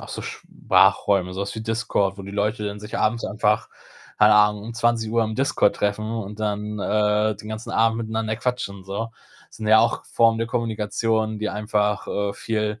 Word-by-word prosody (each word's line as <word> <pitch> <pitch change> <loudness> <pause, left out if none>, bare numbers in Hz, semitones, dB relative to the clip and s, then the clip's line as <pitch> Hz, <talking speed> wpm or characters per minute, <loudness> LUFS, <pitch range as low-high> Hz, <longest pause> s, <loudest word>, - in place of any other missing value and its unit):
auch - - -10
so - - -6
Sprachräume, 95 -3 +2
so 95 - -5
was 100 0 -3
wie 110 - -5
Discord, 110 -3 -1
wo - - -7
die 95 - -8
Leute 105 +1 -1
dann 100 0 -4
sich 105 0 -5
abends 115 +2 +1
einfach, 105 +1 0 0.5
keine 105 0 +6
Ahnung, 105 0 +4
um 115 +1 -7
20:00 115 -1 +1
im 110 0 -3
Discord 135 -4 +2
treffen 105 +1 -1
und 105 -2 -5
dann, 105 0 -2
äh, 105 +1 +1
den 105 +2 -10
ganzen 110 +1 -6
Abend 115 0 +2
miteinander 110 -1 -2
quatschen 110 -6 -3
so. 100 +4 -4 0.4
Sind 110 - -7
ja 110 0 +7
auch 115 +1 0
Formen 115 -1 +3
der 115 - -1
Kommunikation, 110 -1 -1
die 110 0 -2
einfach, 105 -1 -1
äh, 100 0 -1
viel 110 0 -2
110 Hz, 190 wpm, -23 LUFS, 105-115 Hz, 0.5 s, ja